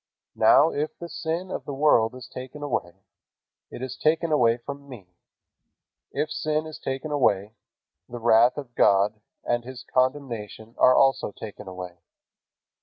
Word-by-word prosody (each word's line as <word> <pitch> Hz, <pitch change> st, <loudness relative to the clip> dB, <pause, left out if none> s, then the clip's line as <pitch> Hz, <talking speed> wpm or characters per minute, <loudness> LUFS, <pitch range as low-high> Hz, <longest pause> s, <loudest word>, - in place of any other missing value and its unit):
Now 160 Hz, -, +5 dB
if 150 Hz, +2 st, -3 dB
the 170 Hz, -, -7 dB
sin 170 Hz, +3 st, -4 dB
of -, -, -5 dB
the 140 Hz, -, -5 dB
world 130 Hz, -5 st, +3 dB
is 130 Hz, -, -10 dB
taken 130 Hz, +3 st, -9 dB
away, 95 Hz, -9 st, -3 dB, 0.7 s
it 125 Hz, -, -8 dB
is 130 Hz, 0 st, -5 dB
taken 160 Hz, +1 st, +1 dB
away 120 Hz, -6 st, +4 dB
from 140 Hz, +3 st, -9 dB
me. 100 Hz, -9 st, -12 dB, 1.0 s
If 150 Hz, +2 st, -2 dB
sin 155 Hz, 0 st, -1 dB
is 155 Hz, -1 st, -9 dB
taken 135 Hz, +3 st, -4 dB
away, 105 Hz, -7 st, +1 dB, 0.6 s
the 120 Hz, -, -6 dB
wrath 120 Hz, +2 st, +4 dB
of 135 Hz, -5 st, -7 dB
God 105 Hz, 0 st, +3 dB, 0.2 s
and 120 Hz, 0 st, 0 dB
His 130 Hz, +1 st, -9 dB
condemnation 120 Hz, -5 st, -1 dB
are 130 Hz, -, +6 dB
also 135 Hz, -5 st, +3 dB
taken 105 Hz, -1 st, -10 dB
away. 90 Hz, -2 st, -8 dB
130 Hz, 150 wpm, -25 LUFS, 110-145 Hz, 1.0 s, are